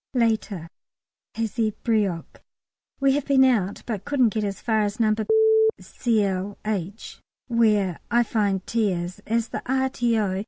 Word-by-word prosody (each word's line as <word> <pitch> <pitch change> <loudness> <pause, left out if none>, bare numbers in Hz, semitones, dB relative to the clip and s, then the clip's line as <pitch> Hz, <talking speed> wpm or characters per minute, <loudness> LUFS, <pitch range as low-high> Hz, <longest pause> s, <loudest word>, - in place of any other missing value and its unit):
Later. 220 -7 0 0.7
Hazebrouck. 215 -4 -1 0.6
We 275 -1 +3
have 285 0 0
been 270 -2 +5
out, 215 -7 +1
but 210 -5 -4
couldn't 260 -3 +2
get 215 - -1
as 200 -1 -3
far 220 -2 +1
as 205 +1 -2
No. 215 -2 +3 0.7
Cl. 205 -4 -1
H. 205 0 -4 0.3
(where 215 -7 +2
I 240 +1 +3
find 200 -4 -1
T. 225 -3 +1
is), 180 +3 -5
as 230 +1 0
the - - -4
R.T.O. 235 -7 0
215 Hz, 130 wpm, -24 LUFS, 200-235 Hz, 0.7 s, been